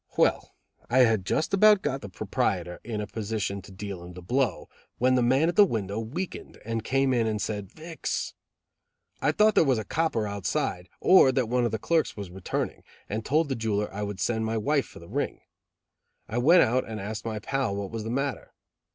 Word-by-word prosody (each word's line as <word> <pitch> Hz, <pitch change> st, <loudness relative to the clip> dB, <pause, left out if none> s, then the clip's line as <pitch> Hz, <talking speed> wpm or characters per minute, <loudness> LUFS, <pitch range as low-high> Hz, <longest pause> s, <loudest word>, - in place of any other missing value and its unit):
Well, -, -, +2 dB, 0.3 s
I 130 Hz, +2 st, +5 dB
had 110 Hz, -6 st, +3 dB
just 155 Hz, -, 0 dB
about 210 Hz, 0 st, +6 dB
got 135 Hz, -2 st, -1 dB
the 100 Hz, -, -7 dB
proprietor 90 Hz, -1 st, -2 dB
in 110 Hz, -2 st, -3 dB
a -, -, -3 dB
position 105 Hz, -2 st, -3 dB
to 95 Hz, -, -14 dB
deal 95 Hz, -2 st, -7 dB
him 90 Hz, +1 st, -10 dB
the 90 Hz, 0 st, -10 dB
blow 125 Hz, +5 st, 0 dB, 0.3 s
when 130 Hz, +1 st, +3 dB
the 125 Hz, -, +3 dB
man 130 Hz, +6 st, +3 dB
at 170 Hz, -, 0 dB
the 205 Hz, -, +8 dB
window 105 Hz, -, -1 dB
weakened, 150 Hz, +12 st, -5 dB
and 115 Hz, -1 st, -2 dB
came 135 Hz, +1 st, +2 dB
in 115 Hz, -2 st, +2 dB
and 110 Hz, -1 st, -1 dB
said, 105 Hz, -3 st, -4 dB
"Vix." 160 Hz, +1 st, -4 dB, 0.9 s
I -, -, +3 dB
thought 215 Hz, 0 st, +4 dB
there -, -, +5 dB
was 135 Hz, -5 st, +2 dB
a 110 Hz, -, -2 dB
copper 155 Hz, -5 st, 0 dB
outside, 95 Hz, -2 st, -2 dB
or 185 Hz, -8 st, +6 dB
that 125 Hz, -3 st, +1 dB
one 125 Hz, 0 st, +2 dB
of 120 Hz, -, 0 dB
the 110 Hz, -, -1 dB
clerks 160 Hz, +6 st, 0 dB
was 100 Hz, -3 st, -6 dB
returning, 95 Hz, 0 st, -3 dB, 0.3 s
and 110 Hz, +2 st, -3 dB
told 155 Hz, +5 st, +2 dB
the 135 Hz, -, -1 dB
jeweler 105 Hz, -3 st, -1 dB
I 105 Hz, -, -4 dB
would 100 Hz, -2 st, -4 dB
send 110 Hz, +1 st, 0 dB
my 110 Hz, 0 st, -1 dB
wife 140 Hz, +5 st, +1 dB
for -, -, -14 dB
the 85 Hz, -, -12 dB
ring. -, -, -3 dB, 0.9 s
I 120 Hz, -, -2 dB
went 170 Hz, +8 st, +6 dB
out 130 Hz, +2 st, +1 dB
and 110 Hz, -1 st, -6 dB
asked 105 Hz, +2 st, -5 dB
my 110 Hz, -1 st, -3 dB
pal 115 Hz, 0 st, -1 dB
what 100 Hz, -1 st, -4 dB
was 115 Hz, -1 st, -4 dB
the 110 Hz, -, -5 dB
matter. 135 Hz, +3 st, -3 dB
115 Hz, 210 wpm, -27 LUFS, 105-135 Hz, 0.9 s, the